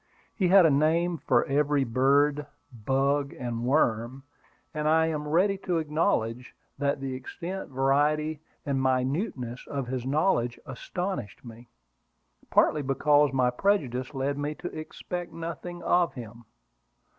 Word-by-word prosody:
He 190 Hz, -, +1 dB
had 190 Hz, 0 st, +7 dB
a 160 Hz, -, +5 dB
name 165 Hz, +4 st, +2 dB
for -, -, +2 dB
every 145 Hz, 0 st, +1 dB
bird, 140 Hz, +4 st, +2 dB, 0.3 s
bug, 135 Hz, +5 st, 0 dB
and 120 Hz, -2 st, -4 dB
worm; 125 Hz, -1 st, +1 dB, 0.5 s
and 150 Hz, -1 st, -2 dB
I 160 Hz, +1 st, +4 dB
am 150 Hz, -2 st, -3 dB
ready 190 Hz, +6 st, +2 dB
to 180 Hz, -3 st, -1 dB
acknowledge 135 Hz, -7 st, -1 dB, 0.2 s
that 140 Hz, 0 st, 0 dB
the 135 Hz, -1 st, -4 dB
extent, 170 Hz, +8 st, -6 dB
variety, 145 Hz, +3 st, +1 dB, 0.2 s
and 135 Hz, -2 st, 0 dB
minuteness 130 Hz, -, -1 dB
of 140 Hz, -2 st, -3 dB
his 125 Hz, 0 st, -4 dB
knowledge 135 Hz, -4 st, +1 dB
astonished 140 Hz, -, -5 dB
me, 120 Hz, +1 st, -12 dB, 0.8 s
partly 150 Hz, -, +3 dB
because 145 Hz, +1 st, +3 dB
my 130 Hz, -2 st, +2 dB
prejudice 130 Hz, -5 st, 0 dB
led 140 Hz, +2 st, -1 dB
me 145 Hz, +1 st, -3 dB
to 175 Hz, +4 st, -7 dB
expect 175 Hz, +3 st, -6 dB
nothing 170 Hz, +1 st, -6 dB
of 175 Hz, -5 st, +2 dB
him. 120 Hz, -1 st, -10 dB
145 Hz, 135 wpm, -27 LUFS, 130-160 Hz, 0.8 s, had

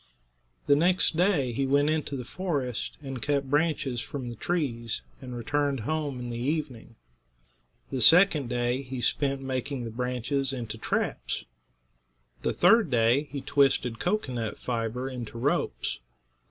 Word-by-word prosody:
The 145 Hz, -, +5 dB
next 170 Hz, +1 st, +3 dB
day 165 Hz, -8 st, +2 dB
he 135 Hz, +3 st, -1 dB
went 145 Hz, +2 st, +3 dB
into 150 Hz, -3 st, -1 dB
the 125 Hz, -, -6 dB
forest 140 Hz, -, -3 dB
and 135 Hz, -3 st, -5 dB
cut 140 Hz, 0 st, 0 dB
branches 145 Hz, -5 st, +1 dB
from 130 Hz, -4 st, -5 dB
the 120 Hz, -, -6 dB
trees, 120 Hz, -6 st, -2 dB, 0.2 s
and 125 Hz, -2 st, -6 dB
returned 140 Hz, +2 st, 0 dB
home 145 Hz, +1 st, -2 dB
in 120 Hz, -1 st, -5 dB
the 120 Hz, -, -4 dB
evening. 130 Hz, -4 st, -3 dB, 1.0 s
The 130 Hz, -, -1 dB
second 160 Hz, -, +6 dB
day 120 Hz, +1 st, 0 dB
he 130 Hz, -1 st, -6 dB
spent 135 Hz, +3 st, 0 dB
making 130 Hz, 0 st, -3 dB
the 115 Hz, -, -5 dB
branches 125 Hz, +3 st, 0 dB
into 115 Hz, -3 st, -5 dB
traps. -, -, -2 dB, 1.0 s
The -, -, 0 dB
third 205 Hz, +1 st, +5 dB
day 125 Hz, +4 st, +3 dB
he 140 Hz, -1 st, -4 dB
twisted 135 Hz, -4 st, +2 dB
cocoanut 125 Hz, -, -1 dB
fiber 120 Hz, +1 st, -2 dB
into 125 Hz, -3 st, -6 dB
ropes. 125 Hz, -, -1 dB
135 Hz, 140 wpm, -28 LUFS, 120-145 Hz, 1.0 s, second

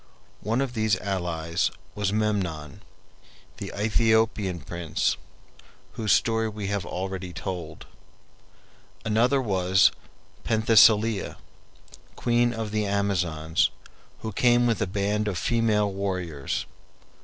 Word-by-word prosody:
One 115 Hz, +5 st, 0 dB
of 135 Hz, -3 st, -2 dB
these 110 Hz, -3 st, +1 dB
allies 85 Hz, -4 st, -1 dB, 0.2 s
was 100 Hz, -2 st, -1 dB
Memnon, 95 Hz, -9 st, -2 dB, 0.8 s
the -, -, -6 dB
Aethiopian 110 Hz, -3 st, +1 dB
prince, 85 Hz, -3 st, -1 dB, 0.8 s
whose 110 Hz, -2 st, -1 dB
story 115 Hz, -1 st, +2 dB
we 105 Hz, -1 st, -6 dB
have 100 Hz, -3 st, -2 dB
already 95 Hz, -1 st, -4 dB
told. 85 Hz, -4 st, -6 dB, 1.2 s
Another 115 Hz, +6 st, +3 dB
was 95 Hz, -5 st, +3 dB, 0.5 s
Penthesilea, 110 Hz, -1 st, +4 dB, 0.8 s
queen 120 Hz, 0 st, +2 dB
of 110 Hz, -2 st, -4 dB
the 105 Hz, -1 st, 0 dB
Amazons, 90 Hz, -6 st, +1 dB, 0.5 s
who 110 Hz, -, -4 dB
came 120 Hz, +3 st, +3 dB
with 115 Hz, -3 st, +1 dB
a -, -, +1 dB
band 105 Hz, +2 st, -1 dB
of 95 Hz, -4 st, -2 dB
female 105 Hz, -1 st, +1 dB
warriors. 90 Hz, -7 st, -3 dB
100 Hz, 105 wpm, -26 LUFS, 90-110 Hz, 1.2 s, Penthesilea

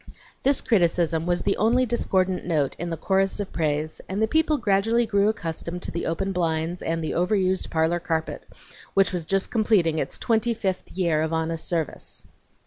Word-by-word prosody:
This 275 Hz, +1 st, +3 dB
criticism 170 Hz, -5 st, +1 dB
was 175 Hz, 0 st, 0 dB
the 200 Hz, -, +1 dB
only 240 Hz, +4 st, +3 dB
discordant 190 Hz, -6 st, 0 dB
note 155 Hz, -6 st, 0 dB
in 175 Hz, +1 st, -3 dB
the 165 Hz, -, -3 dB
chorus 195 Hz, +4 st, +1 dB
of 205 Hz, -, -4 dB
praise, 155 Hz, -1 st, -1 dB
and 190 Hz, +2 st, -2 dB
the 220 Hz, -, +3 dB
people 315 Hz, +3 st, +2 dB
gradually 225 Hz, +1 st, +2 dB
grew 200 Hz, -1 st, +2 dB
accustomed 170 Hz, -3 st, -4 dB
to -, -, -4 dB
the 170 Hz, -, -3 dB
open 180 Hz, +4 st, -1 dB
blinds 165 Hz, -1 st, -1 dB
and 165 Hz, 0 st, -2 dB
the 155 Hz, -, -2 dB
overused 185 Hz, +1 st, +1 dB
parlor 160 Hz, +1 st, +1 dB
carpet, 160 Hz, -2 st, -3 dB, 0.5 s
which 195 Hz, -1 st, +3 dB
was 175 Hz, -3 st, -2 dB
just 195 Hz, +3 st, 0 dB
completing 200 Hz, -8 st, +2 dB
its -, -, -3 dB
twenty 230 Hz, +1 st, +1 dB
fifth 190 Hz, -4 st, -3 dB
year 170 Hz, -4 st, +1 dB
of 160 Hz, +1 st, -1 dB
honest 160 Hz, 0 st, -2 dB
service. 165 Hz, -4 st, -3 dB
180 Hz, 180 wpm, -25 LUFS, 165-205 Hz, 0.5 s, This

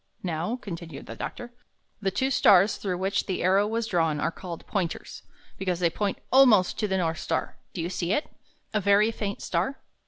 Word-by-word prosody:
"Now," 175 Hz, +5 st, -2 dB
continued 170 Hz, -, -8 dB
the -, -, -8 dB
doctor, 240 Hz, 0 st, -6 dB, 0.5 s
''the 195 Hz, -, +1 dB
two 265 Hz, +1 st, +1 dB
stars 200 Hz, -4 st, +5 dB
thi'ough 185 Hz, -3 st, -3 dB
which 190 Hz, +2 st, -1 dB
the 185 Hz, -, -2 dB
arrow 195 Hz, +3 st, +4 dB
was 225 Hz, +1 st, -1 dB
drawn 165 Hz, -7 st, +1 dB
are -, -, 0 dB
called 170 Hz, -1 st, -8 dB
Pointers, 180 Hz, -5 st, -3 dB, 0.4 s
because 185 Hz, -2 st, -1 dB
they 170 Hz, -2 st, +2 dB
point 200 Hz, +2 st, -1 dB
almost 245 Hz, -9 st, +5 dB
to 210 Hz, -, +1 dB
the 190 Hz, -1 st, 0 dB
North 165 Hz, -3 st, -1 dB
Star. -, -, -3 dB, 0.2 s
Do 175 Hz, -, -2 dB
you 170 Hz, -, -2 dB
see 175 Hz, -1 st, -2 dB
it? 295 Hz, -, +1 dB, 0.5 s
A 210 Hz, -, +1 dB
very 200 Hz, +3 st, +4 dB
faint 205 Hz, -2 st, -4 dB
star?" 185 Hz, +11 st, -1 dB
190 Hz, 190 wpm, -27 LUFS, 175-210 Hz, 0.5 s, stars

